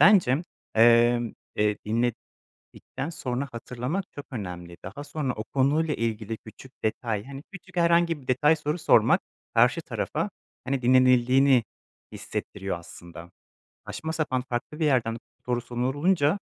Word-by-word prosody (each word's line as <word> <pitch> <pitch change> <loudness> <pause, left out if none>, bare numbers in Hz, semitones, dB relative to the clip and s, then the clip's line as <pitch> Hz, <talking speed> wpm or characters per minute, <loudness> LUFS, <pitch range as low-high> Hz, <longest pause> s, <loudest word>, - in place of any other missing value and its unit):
bence, 175 -7 +6 0.3
emm, 120 +1 +5 0.2
eee, 105 0 +2 0.8
dinledikten 145 - -8
sonra 140 -4 -3
hatırlamak 125 +10 -3
çok 145 - -8
önemli. 90 -6 -6
Daha 110 +10 -7
sonra 145 -4 -2
o 110 - -5
konuyla 145 +5 +1
ilgili 110 -1 -2
küçük 120 +4 -14
detay, 110 -1 -1
hani, 140 +1 -9
küçük 195 -2 -12
herhangi 170 -2 +3
bir 125 - -18
detay 150 +5 +4
soru 150 +1 -2
sormak - - +5 0.3
karşı - - +4
tarafa, - - -2 0.4
hani, 135 0 -1
dinlenildiğini 130 +1 +5 0.5
hissettiriyor 95 -3 -4
aslında. 85 0 -12 0.6
Saçma 160 0 -4
sapan, 135 -6 -1
farklı 125 +6 -4
bir - - +2
yerden 120 -5 +2 0.3
soru 120 -1 0
sorulunca 145 - +1
130 Hz, 125 wpm, -26 LUFS, 115-150 Hz, 0.8 s, bence